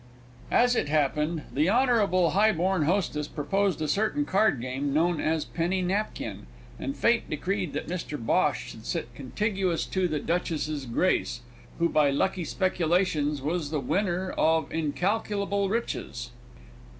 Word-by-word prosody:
As 245 Hz, +1 st, +4 dB
it 145 Hz, -, 0 dB
happened, 150 Hz, +2 st, +1 dB
the 150 Hz, +5 st, +2 dB
honourable 210 Hz, -, +3 dB
highborn 190 Hz, -4 st, +2 dB
hostess 155 Hz, -4 st, 0 dB
proposed 195 Hz, +3 st, 0 dB
a -, -, -1 dB
certain 220 Hz, -, +1 dB
cardgame 140 Hz, -, +1 dB
known 165 Hz, +3 st, +2 dB
as 155 Hz, -1 st, 0 dB
"Penny 180 Hz, +2 st, -1 dB
Napkin," 195 Hz, -, -3 dB, 0.3 s
and 135 Hz, +2 st, -4 dB
fate 230 Hz, -, +2 dB
decreed 180 Hz, +2 st, -2 dB
that 145 Hz, -, -3 dB
Mr 165 Hz, -3 st, -4 dB
Bhosh 140 Hz, +2 st, 0 dB
should 110 Hz, -, -11 dB
sit 120 Hz, +1 st, -3 dB
contiguous 185 Hz, -, -1 dB
to 185 Hz, -1 st, 0 dB
the 155 Hz, -3 st, -1 dB
Duchess's 155 Hz, -5 st, -2 dB
Grace, 120 Hz, -1 st, 0 dB, 0.4 s
who 170 Hz, -, +3 dB
by 150 Hz, -3 st, +3 dB
lucky 175 Hz, +5 st, 0 dB
speculations 165 Hz, -6 st, 0 dB
was 155 Hz, 0 st, -1 dB
the 155 Hz, -1 st, -1 dB
winner 185 Hz, +6 st, -1 dB
of 160 Hz, 0 st, +1 dB
incalculable 200 Hz, +5 st, 0 dB
riches. 230 Hz, +3 st, -3 dB
170 Hz, 135 wpm, -27 LUFS, 150-195 Hz, 0.4 s, As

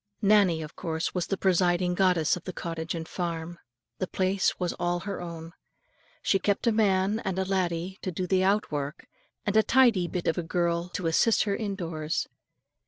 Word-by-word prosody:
Nannie 200 Hz, -6 st, +4 dB
of 155 Hz, -, -10 dB
course 160 Hz, -2 st, -3 dB
was 180 Hz, -2 st, -1 dB
the 195 Hz, -, -1 dB
presiding 180 Hz, -1 st, +2 dB
goddess 180 Hz, -4 st, +3 dB
of 180 Hz, -, -9 dB
the 185 Hz, -, -4 dB
cottage 165 Hz, 0 st, -4 dB
and 160 Hz, -1 st, -5 dB
farm. 170 Hz, -1 st, -4 dB, 0.4 s
The 185 Hz, -, -1 dB
place 190 Hz, +1 st, 0 dB
was 180 Hz, -2 st, -1 dB
all 175 Hz, 0 st, 0 dB
her 195 Hz, -1 st, -5 dB
own. 165 Hz, -1 st, -7 dB, 0.7 s
She 195 Hz, -, +3 dB
kept 205 Hz, +4 st, 0 dB
a 235 Hz, -, +4 dB
man 205 Hz, -1 st, +2 dB
and 190 Hz, -4 st, -3 dB
a 190 Hz, -, 0 dB
laddie 185 Hz, -1 st, -1 dB
to 185 Hz, -, -3 dB
do 180 Hz, +2 st, -3 dB
the 185 Hz, +1 st, +2 dB
out 200 Hz, 0 st, +2 dB
work, 145 Hz, -1 st, -4 dB, 0.4 s
and 205 Hz, -, 0 dB
a 220 Hz, -, +7 dB
tidy 230 Hz, -7 st, +4 dB
bit 175 Hz, 0 st, -4 dB
of 165 Hz, -, +1 dB
a -, -, 0 dB
girl 170 Hz, +1 st, -1 dB
to 180 Hz, -, -3 dB
assist 165 Hz, +7 st, +3 dB
her 205 Hz, -, -1 dB
in 200 Hz, -1 st, -2 dB
doors. 165 Hz, -4 st, -3 dB
180 Hz, 195 wpm, -27 LUFS, 170-195 Hz, 0.7 s, a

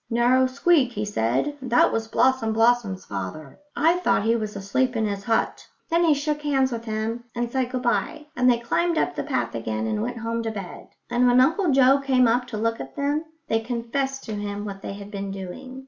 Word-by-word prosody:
"Narrow 245 Hz, +2 st, +3 dB
squeak," 275 Hz, -1 st, +2 dB
he 210 Hz, -1 st, -2 dB
said. 205 Hz, -, -1 dB
"That 245 Hz, -2 st, +3 dB
was 225 Hz, 0 st, -2 dB
Blossom 225 Hz, -1 st, +2 dB
blossom's 225 Hz, -4 st, +2 dB
father. 100 Hz, +9 st, -6 dB, 0.2 s
I 330 Hz, +4 st, +3 dB
thought 195 Hz, -, +2 dB
he 225 Hz, +2 st, +2 dB
was 215 Hz, -2 st, -3 dB
asleep 245 Hz, +6 st, 0 dB
in 220 Hz, -1 st, +1 dB
his 200 Hz, -1 st, -3 dB
hut." 225 Hz, -1 st, 0 dB, 0.2 s
Then 335 Hz, +1 st, +3 dB
he 315 Hz, -3 st, +4 dB
shook 295 Hz, +1 st, -2 dB
hands 270 Hz, -3 st, +1 dB
with 230 Hz, -1 st, -5 dB
them 225 Hz, +2 st, -3 dB
and 240 Hz, 0 st, -2 dB
said 260 Hz, -1 st, 0 dB
good 250 Hz, 0 st, -3 dB
bye, 240 Hz, +6 st, -1 dB
and 250 Hz, 0 st, +3 dB
they 240 Hz, -, +4 dB
climbed 335 Hz, +8 st, 0 dB
up -, -, +1 dB
the -, -, -2 dB
path 120 Hz, -4 st, -2 dB
again 110 Hz, -1 st, -3 dB
and 105 Hz, -1 st, -1 dB
went -, -, -3 dB
home 230 Hz, 0 st, -2 dB
to 225 Hz, -, -2 dB
bed; 200 Hz, -5 st, -7 dB, 0.2 s
and 245 Hz, +1 st, +3 dB
when 245 Hz, +1 st, +5 dB
Uncle 325 Hz, +8 st, +3 dB
Joe 270 Hz, 0 st, +5 dB
came 260 Hz, -3 st, +3 dB
up 245 Hz, +2 st, +1 dB
to 230 Hz, -3 st, -5 dB
look 230 Hz, +1 st, -1 dB
at 135 Hz, -, -8 dB
them, 290 Hz, +3 st, -1 dB, 0.2 s
they 225 Hz, -, +1 dB
confessed 245 Hz, +4 st, -3 dB
to 220 Hz, -, -6 dB
him 205 Hz, 0 st, -4 dB
what 195 Hz, -1 st, -7 dB
they -, -, -5 dB
had 200 Hz, +1 st, -9 dB
been 200 Hz, -1 st, -4 dB
doing. 195 Hz, +8 st, -7 dB
235 Hz, 220 wpm, -24 LUFS, 205-260 Hz, 0.2 s, when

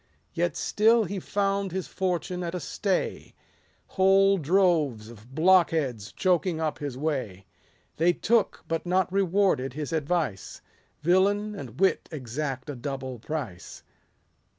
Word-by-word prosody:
Yet 175 Hz, +1 st, -1 dB
still 225 Hz, +2 st, +3 dB
he 200 Hz, -1 st, -4 dB
found 195 Hz, 0 st, -1 dB
his 190 Hz, 0 st, -3 dB
fortune 180 Hz, -1 st, -2 dB
at 175 Hz, 0 st, -3 dB
a -, -, -2 dB
stay; 190 Hz, +3 st, -2 dB, 0.5 s
"Whole 195 Hz, 0 st, +4 dB
droves 155 Hz, -, +1 dB
of 120 Hz, +3 st, -15 dB
blockheads 160 Hz, -, +2 dB
choking 180 Hz, -2 st, +1 dB
up 155 Hz, -2 st, -2 dB
his 140 Hz, -4 st, -5 dB
way; 130 Hz, -11 st, -3 dB, 0.5 s
They 170 Hz, +3 st, +4 dB
took, 225 Hz, +5 st, +1 dB
but 165 Hz, 0 st, -2 dB
not 185 Hz, 0 st, +1 dB
rewarded, 190 Hz, -8 st, +1 dB
his 150 Hz, +1 st, -5 dB
advice; 155 Hz, -, -2 dB, 0.4 s
Villain 200 Hz, +5 st, +2 dB
and 130 Hz, -, -9 dB
wit 190 Hz, -1 st, +2 dB
exact 135 Hz, -1 st, -4 dB
a 145 Hz, -, -5 dB
double 130 Hz, -1 st, -5 dB
price. 125 Hz, -, -6 dB
165 Hz, 130 wpm, -27 LUFS, 135-190 Hz, 0.5 s, Whole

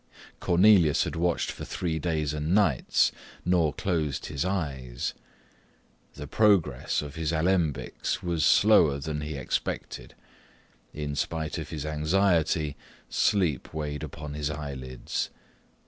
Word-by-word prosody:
Cornelius 90 Hz, -4 st, +5 dB
had -, -, -4 dB
watched 85 Hz, 0 st, 0 dB
for -, -, -8 dB
three 80 Hz, -3 st, -2 dB
days 75 Hz, -3 st, -1 dB
and 75 Hz, +4 st, 0 dB
nights, 85 Hz, -12 st, +3 dB, 0.3 s
nor 85 Hz, -4 st, +3 dB
closed 80 Hz, -5 st, -2 dB
his 70 Hz, -2 st, -2 dB
eyes. 70 Hz, -10 st, -3 dB, 1.0 s
The 75 Hz, -, -7 dB
progress 85 Hz, -, +2 dB
of 70 Hz, -2 st, -8 dB
his 80 Hz, -1 st, -2 dB
alembics 80 Hz, -5 st, 0 dB
was 85 Hz, -3 st, 0 dB
slower 90 Hz, -9 st, +5 dB
than 75 Hz, +1 st, -4 dB
he 75 Hz, 0 st, -4 dB
expected: 60 Hz, -2 st, -4 dB, 0.8 s
in 75 Hz, -1 st, -4 dB
spite 80 Hz, +4 st, -2 dB
of 80 Hz, -1 st, -6 dB
his 75 Hz, -3 st, -5 dB
anxiety, 80 Hz, -1 st, +1 dB, 0.3 s
sleep 90 Hz, -, +1 dB
weighed 75 Hz, -2 st, -3 dB
upon 75 Hz, -1 st, -7 dB
his 75 Hz, 0 st, -2 dB
eyelids. 70 Hz, -4 st, -4 dB
75 Hz, 120 wpm, -27 LUFS, 75-85 Hz, 1.0 s, Cornelius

